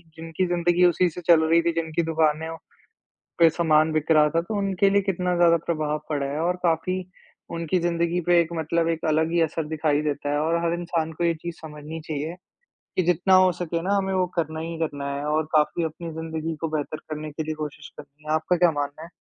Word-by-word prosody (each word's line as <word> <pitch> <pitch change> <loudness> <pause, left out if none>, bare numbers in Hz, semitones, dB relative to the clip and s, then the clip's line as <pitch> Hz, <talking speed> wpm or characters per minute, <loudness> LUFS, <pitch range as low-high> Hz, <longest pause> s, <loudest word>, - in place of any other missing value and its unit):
जिनकी 165 +3 -2
ज़िन्दगी 175 0 +2
उसी 175 +1 +3
से 175 +2 -8
चल 165 -2 +7
रही 165 +1 +4
थी, 170 0 +1
जिनकी 165 0 -1
दुकानें 160 0 +1 0.9
पे 165 -1 +7
सामान 155 -1 +3
बिक 155 +1 -1
रहा 150 -1 +5
था 165 - +1
तो 205 +3 -3
उनके 195 0 +2
लिए 200 0 +3
कितना 180 -2 -1
ज़्यादा 170 -1 +5
प्रभाव 155 -2 -1
पड़ा 145 -2 -1
है 145 +3 -3
और 175 +2 0
काफ़ी 170 +3 +1 0.6
उनकी 170 +2 0
ज़िन्दगी 170 0 0
पे 175 -1 +5
एक 165 - 0
मतलब 165 +1 0
एक 165 -1 -2
अलग 160 +1 +1
ही 170 - +2
असर 160 0 -1
दिखाई 155 -1 +1
देता 145 -1 -2
है 145 - +1
और 160 +2 +1
हर 170 0 +1
इंसान 165 -2 -2
को 170 +2 -3
ये 170 - +2
चीज़ 170 -1 -5
समझनी 155 +1 -8
चाहिए 155 +3 -4 0.6
कि 185 - +3
जितना 180 +2 +3
हो 185 - +4
सके 170 -1 -2
ना 195 +4 0
हमें 195 -1 -1
वो 185 -1 +2
करना 160 -1 -1
ही 165 +1 -5
करना 145 -3 -3
है 140 - -4
और 155 +1 +1
काफ़ी 155 +2 +2
अपनी 165 +1 -5
ज़िन्दगी 160 0 -4
को 165 - 0
बेहतर 150 +1 -4
करने 155 0 -5
के 155 +2 -4
लिए 155 0 -4
कोशिश 150 0 -7
करनी 145 +1 -14
है। 155 - 0
आपका 160 +3 +1
क्या 175 -1 +4
मानना 145 +1 -4
है? 170 - -10
165 Hz, 220 wpm, -24 LUFS, 155-170 Hz, 0.9 s, चल